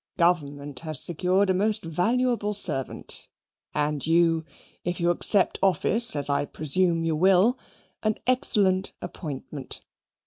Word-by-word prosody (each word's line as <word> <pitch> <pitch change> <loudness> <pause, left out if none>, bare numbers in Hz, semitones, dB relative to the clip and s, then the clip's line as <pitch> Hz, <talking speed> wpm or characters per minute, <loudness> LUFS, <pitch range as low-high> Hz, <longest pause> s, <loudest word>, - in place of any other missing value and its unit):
Government 145 -6 -1
has 155 -3 +5
secured 185 +3 +1
a - - +1
most 210 +3 0
valuable 210 +5 -1
servant, 135 -9 -1 0.4
and 150 -1 -2
you, 165 0 +1 0.4
if 175 +1 -3
you 170 0 +1
accept 190 +2 +4
office, 200 +5 +3
as 145 - 0
I 140 0 0
presume 165 +3 -1
you 160 -1 -1
will, 190 - +3 0.4
an 215 -1 -1
excellent 205 -7 +2
appointment. 140 -3 -4
175 Hz, 125 wpm, -24 LUFS, 155-200 Hz, 0.4 s, has